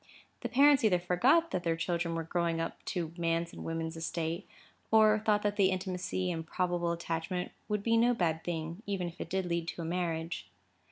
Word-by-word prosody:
The - - -4
parents 280 0 +6
either 200 -5 +5
forgot 245 - +3
that 180 - -1
their 165 -1 0
children 170 0 -1
were 165 - -2
growing 170 0 0
up 165 - -4
to 165 -2 -3
man's 165 0 0
and - - -8
woman's 165 0 -3
estate, 165 +2 -3 0.4
or 215 -1 +6
thought 210 -1 +2
that 205 0 0
the 195 -2 +5
intimacy 185 -1 -2
and 165 -1 -3
probable 175 0 -1
attachment 170 +2 -3 0.2
would 210 -2 -1
be 230 +1 +3
no 240 +1 +4
bad 165 -5 0
thing, 165 +2 -4
even 190 -3 -1
if 170 - -11
it - - -5
did 190 +1 0
lead 170 -1 -1
to 170 - -4
a - - -4
marriage. 165 -1 -2
175 Hz, 200 wpm, -31 LUFS, 165-200 Hz, 0.4 s, parents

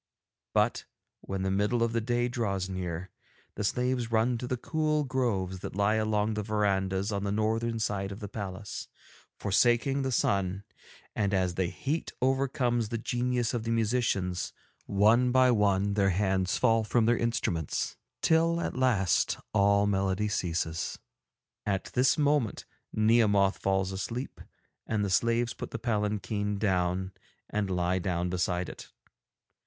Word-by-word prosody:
But - - +2 0.3
when 95 -1 -4
the 95 - 0
middle 105 +5 +1
of 115 0 0
the 115 - +1
day 120 +1 0
draws 100 -7 -2
near, 90 -1 -4 0.4
the - - -4
slaves 125 +2 0
run 115 +2 +2
to 125 - -4
the 125 - -1
cool 155 +3 0
groves 115 -9 -1
that - - -7
lie 100 +1 +2
along 110 0 +1
the 105 - -2
verandahs 100 -1 0
on 100 -1 -2
the 100 - -1
northern 110 +2 0
side 100 -3 -2
of 100 - -7
the 105 - -6
palace, 100 -1 -6 0.5
forsaking 120 +6 +2
the 135 -1 -1
sun, 100 -4 0 0.5
and 100 -1 +1
as 90 -2 +1
the 90 0 0
heat 145 - -3
overcomes 130 -3 +1
the 115 - -2
genius 120 +1 -1
of 120 - -1
the 115 - -3
musicians, 110 -6 0 0.3
one 110 +5 +4
by 130 0 +5
one 100 -2 +2
their 100 -1 +3
hands 95 -1 +1
fall 115 0 +3
from 110 +1 +2
their 120 +2 +4
instruments, 105 -10 -1 0.3
till 165 +1 +3
at - - -3
last 120 -8 +2 0.2
all 100 0 +4
melody 100 +1 +1
ceases. 85 -4 -2 0.7
At 100 -2 -2
this 125 +1 +3
moment 145 -7 +1 0.3
Nehemoth 110 -3 +3
falls 95 0 0
asleep, 110 +7 -5 0.5
and 105 -2 0
the 100 - -2
slaves 115 +4 +2
put - - -7
the - - -4
palanquin 105 -2 -1
down 95 -2 0 0.4
and 105 -2 -1
lie 90 0 0
down 90 -1 -1
beside 90 0 -1
it. - - -10
105 Hz, 150 wpm, -29 LUFS, 95-120 Hz, 0.7 s, by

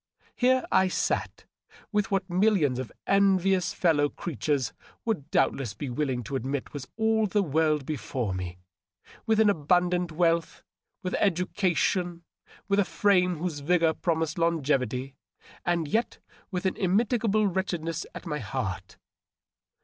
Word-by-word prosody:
Here 255 +1 +3
I 190 - +4
sat, - - -2 0.5
with 210 -2 +1
what 195 -1 0
millions 180 - +2
of 130 - -5
envious 195 -2 +3
fellow 145 -5 +2
creatures 135 - -2 0.3
would 210 -12 -2
doubt - - +3
less 120 -7 -5
be 130 +4 -5
willing 130 -2 -1
to 135 - -5
admit 135 +1 -3
was 140 -3 -6
all 220 -1 +2
the 205 +2 +1
world 155 -2 +1
before 125 -7 -3
me 90 -1 -5 0.3
— 90 - -24
with 220 -1 +3
abundant 180 -2 +2
wealth, 165 0 0 0.4
with 185 - -3
education, 180 -2 0 0.4
with 200 0 +2
a - - +5
frame 180 -2 +2
whose 160 -2 -3
vigor 165 +2 +2
promised 160 -1 -1
longevity, 135 -6 0 0.5
and 170 -3 +1
yet 225 +9 0 0.3
with 180 -1 -3
an 190 - 0
immitigable 215 +2 +2
wretchedness 170 -4 -2
at - - -8
my 150 -3 -3
heart. 95 -10 -4
170 Hz, 135 wpm, -27 LUFS, 140-190 Hz, 0.5 s, a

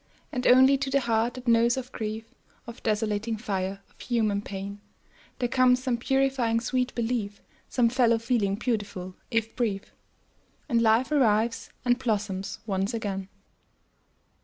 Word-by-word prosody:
And 250 -1 -1
only 260 +2 +6
to 275 0 -2
the 275 +1 +2
heart 235 0 +1
that 255 -1 -9
knows 235 +1 +4
of 255 -1 -5
grief, 220 0 -4 0.4
Of 235 0 -10
desolating 215 0 -1
fire, 195 -3 -3
of - - -31
human 215 -4 0
pain, 200 0 -7 0.6
There 245 - 0
comes 255 +1 +3
some 255 -3 0
purifying 265 -3 +1
sweet 250 +2 -1
belief, 225 -4 -2 0.3
Some 245 -2 +3
fellow 235 -1 +3
feeling 225 -4 0
beautiful, 205 -5 -3
if 225 -1 -1
brief. 210 -5 -2 0.7
And 235 -5 +2
life 230 +5 +3
revives, 230 -5 +2 0.2
and 245 0 +3
blossoms 205 -5 -2
once 195 +1 -1
again. 195 -3 -4
230 Hz, 140 wpm, -27 LUFS, 205-250 Hz, 0.7 s, only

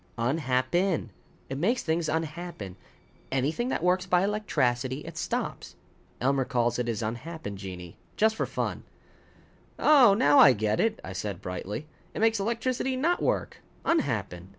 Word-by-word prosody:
"Unhap 130 +1 0
pen. 175 - +1 0.4
It 135 +1 -4
makes 230 - +1
things 160 0 0
unhappen. 160 - -4 0.6
Anything 145 - 0
that 170 - -2
works 185 +1 +2
by 180 0 +3
electracity, 130 - 0
it - - -9
stops. - - -3 0.4
Elmer 135 +1 +2
calls 120 -2 0
it 120 - -1
his 115 -2 -2
unhappen 120 +1 -5
genii. 90 -3 -8 0.2
Just 220 +1 +3
for - - -1
fun." - - -3 1.0
"Oh, 265 -9 +6
now 145 -8 +5
I 135 - +9
get 110 -1 0
it," 225 0 +1
I 95 - -6
said 95 -1 -4
brightly. 95 +9 -5 0.3
"It - - -3
makes 225 0 +3
electricity 240 +5 -1
not 330 +7 +1
work - - -1 0.2
unhappen. 105 - -1
145 Hz, 150 wpm, -28 LUFS, -, 1.0 s, I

